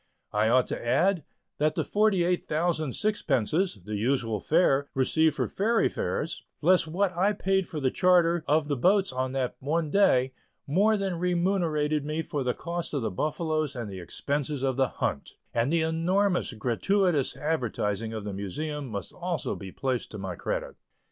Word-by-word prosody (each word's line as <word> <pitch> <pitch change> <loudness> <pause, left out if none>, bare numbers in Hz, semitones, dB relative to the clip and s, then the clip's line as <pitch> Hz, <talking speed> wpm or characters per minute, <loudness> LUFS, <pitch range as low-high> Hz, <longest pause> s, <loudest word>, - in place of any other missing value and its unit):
I 105 +1 +2
ought 125 +1 +4
to - - -4
add, 175 +8 +2 0.4
that 150 +1 +2
the - - 0
forty 210 -4 +2
eight 180 +1 +1
thousand 155 -3 -1
sixpences 160 - 0
the 105 - -4
usual 115 -1 0
fare 145 - +2
received 160 +4 +2
for - - 0
ferry 225 +3 +1
fares, - - -3 0.2
less 185 -3 +4
what 185 +3 0
I 195 +4 +2
paid 190 -2 0
for 160 - -5
the 130 -2 +1
charter 175 -2 +3
of 150 0 +2
the 145 - 0
boats 190 +5 +3
on 130 0 -2
that 130 -2 -2
one 155 +2 -1
day, 130 -10 +3 0.3
more 205 +9 +3
than 190 -4 -2
remunerated 170 -5 +1
me 155 +2 -2
for 145 -3 -3
the 125 -1 0
cost 170 -2 -4
of 135 - -1
the - - -1
buffaloes 155 - -1
and 115 -5 -5
the 95 - -7
expenses 140 - -3
of 135 -2 +1
the 135 0 +2
"hunt," 70 - -3 0.2
and 120 +4 +1
the 165 -1 +2
enormous 175 +4 +1
gratuitous 145 - +1
advertising 115 -8 -1
of 110 -2 -5
the 105 -1 -5
Museum 145 - -4
must 100 -5 -5
also 175 -5 -3
be 95 -1 -8
placed 130 +1 -2
to 105 - -8
my 95 -2 -4
credit. - - -4
155 Hz, 175 wpm, -27 LUFS, 125-180 Hz, 0.4 s, ought